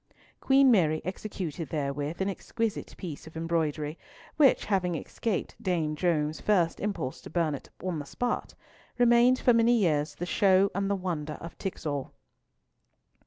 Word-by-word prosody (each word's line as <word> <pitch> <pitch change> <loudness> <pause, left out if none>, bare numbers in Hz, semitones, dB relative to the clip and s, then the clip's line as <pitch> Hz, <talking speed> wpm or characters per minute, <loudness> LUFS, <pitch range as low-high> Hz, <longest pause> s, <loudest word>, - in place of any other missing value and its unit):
Queen 270 -1 +5
Mary 160 -8 +3
executed 180 -4 -5
therewith 145 +2 -3
an 190 - +1
exquisite 220 +2 -3
piece 160 -3 -7
of 160 - -10
embroidery, 160 -2 -1 0.4
which 285 -3 +4
having 185 -4 0
escaped 205 +5 -3
Dame 165 -5 0
Joan's 155 -2 0
first 180 -6 +2
impulse 200 -10 -3
to - - -10
burn 165 -2 0
it 140 - -7
on 180 -4 -2
the 145 - -6
spot, 245 - -3 0.4
remained 245 +1 +5
for 245 - +4
many 230 +1 +4
years 155 -7 +1
the 175 - -4
show 190 +1 +3
and 195 +1 -1
the 200 - +2
wonder 165 -5 -3
of 165 +2 -9
Tixall. 145 -7 -4
175 Hz, 150 wpm, -28 LUFS, 155-205 Hz, 0.4 s, Queen